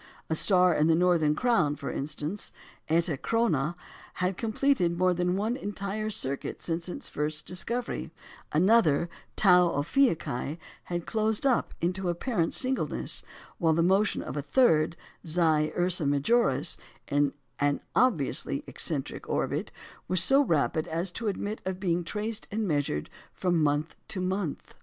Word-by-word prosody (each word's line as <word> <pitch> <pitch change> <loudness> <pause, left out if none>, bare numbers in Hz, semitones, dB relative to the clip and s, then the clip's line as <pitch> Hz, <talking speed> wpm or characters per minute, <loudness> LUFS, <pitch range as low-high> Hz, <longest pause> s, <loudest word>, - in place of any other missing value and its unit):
A - - +2
star 180 0 +4
in 155 0 +2
the 165 - +4
Northern 165 -4 +3
Crown, 230 -12 +2
for 145 -2 -5
instance 150 +7 -4 0.4
(Eta 165 -2 +1
Coronæ), 175 - 0 0.4
had 180 +1 -1
completed 220 -5 +1
more 185 0 +3
than 180 +1 0
one 215 +5 0
entire 205 -1 -4
circuit 140 -10 -3
since 170 +1 -3
its - - -5
first 150 +1 -1
discovery; 235 +7 -3 0.4
another, 170 -2 +4 0.3
Tau 180 -3 +6
Ophiuchi, 160 - 0 0.3
had 175 -1 -3
closed 220 +1 0
up 260 -3 +1
into 180 +2 -1
apparent 175 0 0
singleness; 260 0 0 0.4
while 165 -2 +3
the 165 +1 +2
motion 195 +4 +2
of - - -6
a 145 - -1
third, 160 - +3 0.3
Xi 165 0 -2 0.3
Ursæ 175 -4 +1
Majoris, 145 - +2 0.3
in 145 -1 +1 0.3
an 145 0 +1 0.2
obviously 200 - +2
eccentric - - -3
orbit, - - -1 0.4
was 185 -1 +3
so 270 +7 +6
rapid 155 - +1
as 170 +3 -1
to 225 +4 -4
admit 205 +1 -3
of 190 -1 -3
being 175 -2 0
traced 210 +5 -4
and 215 0 -2
measured 145 - -1 0.3
from 175 -3 +1
month 150 +1 0
to 190 - -3
month. 185 -3 -3
175 Hz, 145 wpm, -28 LUFS, 155-210 Hz, 0.4 s, Tau